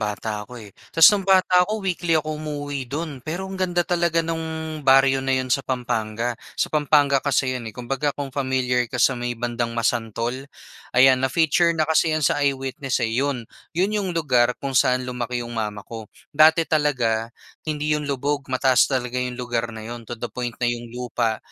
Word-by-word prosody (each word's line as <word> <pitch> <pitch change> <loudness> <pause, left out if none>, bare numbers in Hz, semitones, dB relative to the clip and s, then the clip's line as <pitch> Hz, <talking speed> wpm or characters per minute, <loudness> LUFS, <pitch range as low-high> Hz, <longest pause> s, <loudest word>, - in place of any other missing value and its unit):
bata 105 0 -3
ako, 125 +4 -10
eh. 105 -4 -11 0.2
Ta's 165 0 +4
nung 205 - +1
bata 185 -1 +4
ako, 215 -2 -3
weekly 175 -3 +1
ako 155 0 -3
umuuwi 145 -3 -5
dun. 145 0 -5
Pero, 165 +8 -4
ang 190 0 -7
ganda 175 -1 +1
talaga 170 -2 +1
nung 160 -1 -4
baryo 135 -1 +4
na 135 0 0
yun 130 -1 -1
sa 135 - +2
Pampanga. 120 -3 -2 0.2
Sa - - -1
Pampanga 145 -2 +3
kasi 135 -2 +1
yun, 120 -3 -5
eh. 105 - -12
Kumbaga, 135 +4 -2
kung 140 -2 -5
familiar 130 -3 0
ka 125 - -5
sa 125 +2 +4
may 120 -1 -4
bandang 120 0 -3
Masantol, 120 +3 -2 0.5
ayan, 130 0 +6
na-feature 165 +5 +2
na 155 - +2
kasi 160 +1 +2
'yan 155 - -1
sa 145 - +2
Eyewitness, 135 -2 -1
eh. 115 - -2
Yun, 130 -1 -1 0.3
yun 190 +4 +1
yung 205 -3 -1
lugar 125 -6 +2
kung 135 - -2
saan 125 0 +3
lumaki 125 -1 -3
yung 120 - -8
mama 105 -3 -4
ko. 110 -2 -9 0.2
Dati 160 +2 +5
talaga 125 -8 0 0.4
hindi 150 0 -1
yun 150 -1 -2
lubog, 140 +1 -2
mataas 130 0 +3
talaga 125 -2 -2
yung 125 -1 -3
lugar 120 -2 -2
na 110 - -8
yun, 120 -1 -8
to 120 - -5
the 120 - -4
point 120 -1 -4
na 120 - 0
yung 120 0 -7
lupa 120 -2 -2
130 Hz, 190 wpm, -23 LUFS, 120-155 Hz, 0.5 s, ayan